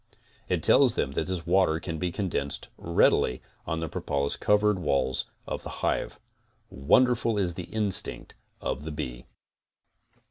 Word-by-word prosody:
It -, -, 0 dB
tells -, -, +5 dB
them 70 Hz, -, 0 dB
that 75 Hz, -, -2 dB
this 90 Hz, -3 st, -3 dB
water 90 Hz, -2 st, +3 dB
can 80 Hz, -2 st, -5 dB
be 90 Hz, +1 st, -1 dB
condensed 85 Hz, -8 st, -3 dB
readily 75 Hz, -6 st, +2 dB, 0.3 s
on 80 Hz, 0 st, -2 dB
the 80 Hz, -, -2 dB
propolis 70 Hz, -1 st, -1 dB
covered 105 Hz, -1 st, +2 dB
walls 70 Hz, -6 st, 0 dB, 0.2 s
of -, -, -4 dB
the -, -, -7 dB, 0.2 s
hive. -, -, -1 dB, 0.5 s
Wonderful 115 Hz, -, +3 dB
is 90 Hz, -4 st, 0 dB
the 90 Hz, 0 st, -6 dB
instinct 105 Hz, -2 st, -1 dB, 0.3 s
of 70 Hz, -, -3 dB
the 80 Hz, -, -5 dB
bee! -, -, -6 dB
85 Hz, 145 wpm, -27 LUFS, 70-95 Hz, 0.5 s, tells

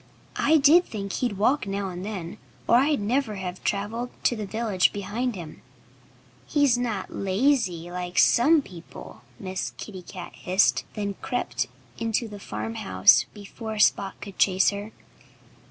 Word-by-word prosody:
I 315 Hz, +2 st, +5 dB
did 310 Hz, +5 st, +6 dB
think 200 Hz, -3 st, -5 dB
he'd 240 Hz, -6 st, -1 dB
walk 225 Hz, +4 st, +2 dB
now 195 Hz, 0 st, -2 dB
and 180 Hz, 0 st, -6 dB
then, 195 Hz, -2 st, -6 dB, 0.3 s
or 235 Hz, -, +6 dB
I'd 285 Hz, +3 st, +3 dB
never 225 Hz, +2 st, 0 dB
have 185 Hz, -1 st, -6 dB
travelled 220 Hz, +5 st, -2 dB
to 240 Hz, -, +3 dB
the 215 Hz, -3 st, -5 dB
village 215 Hz, -3 st, +1 dB
behind 210 Hz, +5 st, -3 dB
him." 165 Hz, -4 st, -9 dB, 0.9 s
"He's 285 Hz, -4 st, +3 dB
not 230 Hz, -6 st, -3 dB
lazy, 190 Hz, -, 0 dB
like 180 Hz, 0 st, -5 dB
some 295 Hz, +5 st, +5 dB
people," 175 Hz, -, -12 dB, 0.2 s
Miss 190 Hz, -1 st, -4 dB
Kitty 190 Hz, -4 st, -8 dB
Cat 180 Hz, 0 st, -9 dB
hissed; 185 Hz, +2 st, +2 dB
and 205 Hz, -2 st, -2 dB
then -, -, -28 dB
crept 245 Hz, -, -2 dB, 0.3 s
into 230 Hz, +1 st, -1 dB
the 205 Hz, -1 st, -9 dB
farmhouse 105 Hz, -, +2 dB
before 215 Hz, +2 st, -7 dB
Spot 200 Hz, -2 st, +2 dB
could 200 Hz, -2 st, -10 dB
chase 190 Hz, 0 st, +4 dB
her. 205 Hz, +2 st, -6 dB
205 Hz, 150 wpm, -25 LUFS, 185-235 Hz, 0.9 s, did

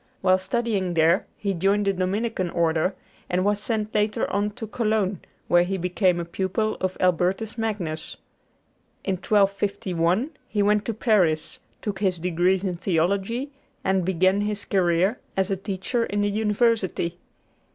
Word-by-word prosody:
While 185 Hz, 0 st, +4 dB
studying 195 Hz, -4 st, -1 dB
there 165 Hz, +3 st, +3 dB
he 200 Hz, -1 st, -1 dB
joined 195 Hz, +3 st, +1 dB
the 195 Hz, -, +2 dB
Dominican 190 Hz, +1 st, -1 dB
Order, 165 Hz, +2 st, +1 dB, 0.3 s
and 180 Hz, +1 st, +1 dB
was 205 Hz, 0 st, +2 dB
sent 215 Hz, -2 st, -2 dB
later 210 Hz, 0 st, +1 dB
on 205 Hz, +1 st, +1 dB
to 225 Hz, +1 st, -6 dB
Cologne, 215 Hz, -3 st, 0 dB, 0.3 s
where 175 Hz, 0 st, +5 dB
he 190 Hz, +2 st, -1 dB
became 180 Hz, 0 st, +1 dB
a 170 Hz, -, -3 dB
pupil 190 Hz, +5 st, -1 dB
of 185 Hz, 0 st, -1 dB
Albertus 185 Hz, +4 st, +1 dB
Magnus. 200 Hz, -9 st, -3 dB, 0.9 s
In 195 Hz, -, 0 dB
1251 200 Hz, -, +1 dB, 0.2 s
he 205 Hz, -5 st, 0 dB
went 210 Hz, 0 st, +2 dB
to 230 Hz, -, -2 dB
Paris, 185 Hz, -9 st, +1 dB, 0.2 s
took 200 Hz, -3 st, -3 dB
his 190 Hz, -3 st, +1 dB
degrees 180 Hz, +2 st, +1 dB
in 180 Hz, -3 st, -2 dB
theology, 195 Hz, -, 0 dB, 0.3 s
and 190 Hz, -1 st, +2 dB
began 185 Hz, +2 st, +2 dB
his 210 Hz, 0 st, -2 dB
career 185 Hz, +3 st, +2 dB, 0.2 s
as 190 Hz, +1 st, +1 dB
a -, -, +2 dB
teacher 195 Hz, +5 st, -2 dB
in 205 Hz, 0 st, -1 dB
the 205 Hz, 0 st, +1 dB
University. 210 Hz, -5 st, +1 dB
195 Hz, 150 wpm, -24 LUFS, 180-210 Hz, 0.9 s, where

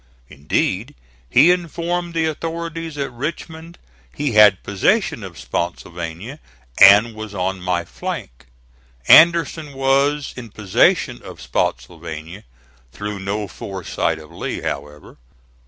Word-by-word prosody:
Indeed, 70 Hz, +1 st, -2 dB, 0.3 s
he 165 Hz, -, +6 dB
informed 175 Hz, 0 st, -2 dB
the 165 Hz, -1 st, +1 dB
authorities 165 Hz, 0 st, -4 dB
at 140 Hz, -3 st, -3 dB
Richmond 160 Hz, +5 st, -6 dB, 0.3 s
he 145 Hz, -, -2 dB
had 105 Hz, -3 st, +6 dB
possession 150 Hz, -, 0 dB
of 95 Hz, -3 st, -9 dB
Spottsylvania 85 Hz, -, -5 dB, 0.4 s
and 105 Hz, +4 st, +8 dB
was 110 Hz, -1 st, -8 dB
on 95 Hz, 0 st, -2 dB
my 90 Hz, -1 st, -1 dB
flank. -, -, -7 dB, 0.6 s
Anderson 165 Hz, -2 st, +5 dB
was 135 Hz, +2 st, +1 dB
in 120 Hz, -3 st, -9 dB
possession 100 Hz, -3 st, +1 dB
of -, -, -11 dB
Spottsylvania, 80 Hz, -, -4 dB, 0.5 s
through 105 Hz, +4 st, -6 dB
no 100 Hz, +2 st, -3 dB
foresight 95 Hz, -1 st, -3 dB
of -, -, -13 dB
Lee, -, -, -5 dB
however. 75 Hz, +1 st, -6 dB
110 Hz, 110 wpm, -20 LUFS, -, 0.6 s, and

